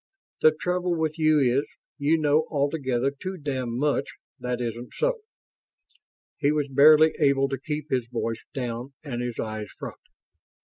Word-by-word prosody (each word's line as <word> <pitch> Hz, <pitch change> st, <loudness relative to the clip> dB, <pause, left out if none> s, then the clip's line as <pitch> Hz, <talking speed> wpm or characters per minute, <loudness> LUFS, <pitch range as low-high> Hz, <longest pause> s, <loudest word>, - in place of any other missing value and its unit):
"The -, -, +8 dB
trouble 180 Hz, 0 st, 0 dB
with 160 Hz, 0 st, -1 dB
you 155 Hz, -1 st, +4 dB
is, 135 Hz, +1 st, +2 dB, 0.3 s
you 150 Hz, +3 st, +3 dB
know 155 Hz, 0 st, +2 dB
altogether 140 Hz, -3 st, 0 dB
too 185 Hz, +7 st, -6 dB
damned 130 Hz, -6 st, -3 dB
much 145 Hz, 0 st, 0 dB, 0.2 s
that 125 Hz, -1 st, -2 dB
isn't 120 Hz, 0 st, -5 dB
so." -, -, 0 dB, 1.2 s
He 145 Hz, -1 st, +3 dB
was 150 Hz, -2 st, 0 dB
barely 155 Hz, +3 st, +7 dB
able 140 Hz, -2 st, +3 dB
to 135 Hz, -2 st, -3 dB
keep 150 Hz, 0 st, -4 dB
his 125 Hz, -3 st, 0 dB
voice 115 Hz, -1 st, -3 dB
down 125 Hz, +1 st, -4 dB
and 120 Hz, -5 st, -4 dB
his 120 Hz, -2 st, -4 dB
eyes 110 Hz, -1 st, -4 dB
front. -, -, -8 dB
140 Hz, 150 wpm, -26 LUFS, 125-155 Hz, 1.2 s, The